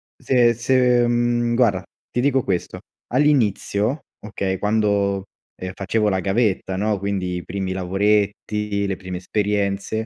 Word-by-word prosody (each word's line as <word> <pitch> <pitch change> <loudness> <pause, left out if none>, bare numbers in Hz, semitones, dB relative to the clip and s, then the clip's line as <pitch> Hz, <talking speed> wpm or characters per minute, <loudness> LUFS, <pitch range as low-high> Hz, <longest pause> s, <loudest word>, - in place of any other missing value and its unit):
se 120 -2 +3
se 125 0 +3
mhmm, 120 0 +1
guarda, 105 -7 +2 0.3
ti 125 - 0
dico 135 -2 +2
questo: 90 -3 -2 0.3
all'inizio, 125 -2 +1 0.2
okay, 95 -2 -2
quando, 100 -2 +1 0.3
ehm, 95 0 -5
facevo 105 +3 0
la 95 -1 0
gavetta, 95 -2 0
no, 105 -1 0
quindi 95 -2 -2
i 90 - -6
primi 95 0 -3
lavoretti, 100 +2 0
le 95 - -1
prime 90 -1 -6
esperienze, 100 +2 -1
105 Hz, 130 wpm, -22 LUFS, 95-120 Hz, 0.3 s, se